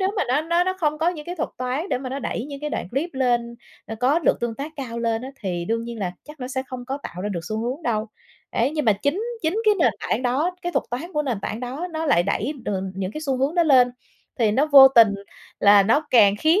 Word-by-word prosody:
nếu 380 - +2
mà 390 - +2
nó 260 +4 +2
nó 340 +2 +1
nó 370 0 -1
không 305 -1 0
có 325 - +2
những 320 -4 -5
cái 355 - -4
thuật 320 - -2
toán 255 +8 -2
để - - 0
mà 260 - -6
nó 270 - -3
đẩy 250 -3 -3
những 280 -1 -8
cái 300 0 -4
đoạn 175 - -4
clip 305 +7 -2
lên, 240 -2 0 0.3
nó 225 - -5
có 270 +6 +3
lượt 335 - +1
tương 235 -1 -2
tác 285 +6 -6
cao 235 -4 -5
lên 230 0 -1
á, 265 - -6
thì 175 -4 -3
đương 230 +3 -2
nhiên 235 -1 -7
là 180 -3 -2
chắc 300 -1 -13
nó 250 - -4
sẽ 260 0 -2
không 250 -1 -7
có 270 +2 -3
tạo 180 - -7
ra 205 - -2
được 180 -4 -3
xu 215 - -2
hướng 255 +7 -3
đâu. 220 -3 -1 0.4
Ấy, 245 +5 +1
nhưng 305 -3 -2
mà 215 - +5
chính 315 +9 0 0.2
chính 350 +8 0
cái 425 -1 +5
nền - - +3
tảng - - -1
đó, 290 +9 0
cái 350 - -3
thuật - - 0
toán 315 +10 -5
của 300 - 0
nền 250 -8 -2
tảng 220 +3 -4
đó 265 +8 -4
nó 320 0 -2
lại 175 -10 +4
đẩy, 215 +8 -1
ờ, 195 -2 -1
những 190 +1 -4
cái 305 - -6
xu 275 -4 -1
hướng 270 +5 0
đó 345 - +4
lên, 260 -5 +5 0.5
thì 225 -3 +3
nó 280 +6 +2
vô 270 -1 +11
tình 230 -5 +5 0.5
là 205 0 +7
nó 285 +10 +2
càng 205 -5 +6
khiến 325 +6 +4
260 Hz, 280 wpm, -23 LUFS, 230-305 Hz, 0.5 s, vô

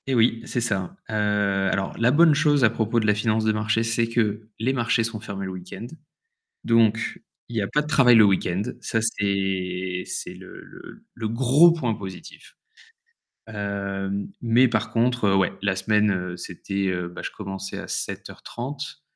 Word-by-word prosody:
Et 135 - +1
oui, 115 0 +3
c'est 120 - -2
ça, 95 -6 -2 0.2
heu, - - -5 0.6
alors, 95 0 -2
la 115 +1 +4
bonne 160 +4 +6
chose 145 -2 +3
à 110 - +5
propos 115 0 0
de 110 - -1
la 105 - +4
finance 110 +1 0
de 110 - +3
marché, 110 +1 0
c'est 115 0 0
que 110 -2 -1
les 125 +4 +1
marchés 115 -2 +1
sont 110 -1 -4
fermés 100 -3 -6
le 95 - -5
week-end, 90 +4 -8 0.8
donc 115 -1 +2 0.3
il 120 - -9
n'y 110 - +1
a 100 - -2
pas 150 - +1
de 150 - -4
travail 130 -5 +5
le 110 - +8
week-end. 95 -1 +1 0.2
Ça 115 - -1
c'est 95 -4 -1
c'est - - -5
le - - -12
le - - -14
le 110 -2 -3
gros 130 +8 +5
point 130 -9 0
positif, 95 -3 -10 0.9
heu, 100 -2 -3 0.3
mais 120 +2 +4
par 115 -1 -1
contre, 115 -3 +2
ouais, 95 -2 +2
la 100 -1 0
semaine, 105 +2 +2
heu, 90 -1 -3
c'était, 95 +3 -4
heu, 90 -1 -2
bah, 90 - -9
je - - -4
commençais 95 -1 -6
à - - -7
7:30 140 +4 -6
110 Hz, 180 wpm, -24 LUFS, 95-120 Hz, 0.9 s, le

